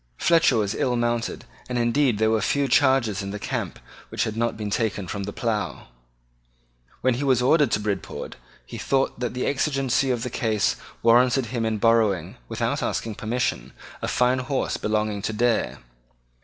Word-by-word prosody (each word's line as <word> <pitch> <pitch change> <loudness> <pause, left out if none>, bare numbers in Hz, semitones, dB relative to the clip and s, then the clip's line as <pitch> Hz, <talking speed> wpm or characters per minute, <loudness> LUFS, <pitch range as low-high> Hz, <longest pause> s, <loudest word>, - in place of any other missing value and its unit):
Fletcher 165 -7 +4
was 105 -1 0
ill 125 +1 0
mounted; 120 0 -1 0.2
and 125 - -1
indeed 120 0 +2
there 110 +1 +2
were 110 -1 +2
few 140 +6 +1
chargers 130 -6 +3
in 100 - -5
the 105 - -4
camp - - -4 0.3
which - - -1
had 110 - -3
not 115 0 -1
been 105 -2 -4
taken 105 -4 -1
from 100 +1 -4
the 100 - -4
plough. 110 - -3 1.1
When 130 - +3
he 125 +4 -3
was 130 -3 +3
ordered 145 +4 +4
to - - +1
Bridport, 100 -2 -4 0.3
he - - -8
thought 135 -3 0
that 120 -1 -3
the 125 - -1
exigency 135 -2 +1
of 120 -2 0
the 125 - -4
case 110 -4 +1 0.3
warranted 125 +2 +4
him 115 -2 0
in 110 -1 -1
borrowing, 105 -6 +2
without - - -1
asking 115 - -2
permission, 105 - -2 0.3
a - - -2
fine 125 +1 +2
horse 130 +1 -1
belonging 105 -1 -1
to 110 - -2
Dare. 120 +1 +1
115 Hz, 175 wpm, -24 LUFS, 105-130 Hz, 1.1 s, Fletcher